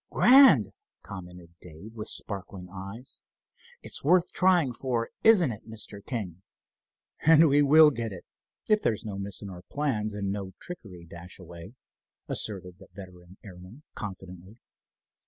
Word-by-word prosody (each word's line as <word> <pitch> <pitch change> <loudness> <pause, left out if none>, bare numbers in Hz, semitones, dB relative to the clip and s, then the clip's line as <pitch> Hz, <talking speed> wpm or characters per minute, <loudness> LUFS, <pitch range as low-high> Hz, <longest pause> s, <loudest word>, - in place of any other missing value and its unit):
"Grand!" 270 +2 +6 0.3
commented 90 -3 -11
Dave, 90 +6 -12
with 110 -2 -6
sparkling 95 -2 -5
eyes. 100 +7 -9 0.6
"It's - - -5
worth 180 -1 +3
trying 175 -8 +2
for, 120 -2 -3
isn't 190 - +5
it, 110 +1 -11
Mr. 105 -2 -7
King?" 95 -8 -5 0.8
"And 160 +1 +6
we 145 0 +4
will 150 +2 +7
get 115 -4 -4
it, 95 - -10 0.4
if 215 -1 +3
there's 110 -2 -1
no 100 -2 -5
miss 100 0 -6
in 100 - -7
our 90 -1 -10
plans—and 105 -8 -2
no 100 -2 -5
trickery, 95 - -9
Dashaway," 85 +3 -11 0.5
asserted 90 -4 -2
the - - -15
veteran 90 -2 -13
airman, 95 +7 -13
confidently. 95 0 -9
100 Hz, 135 wpm, -27 LUFS, 90-130 Hz, 0.8 s, will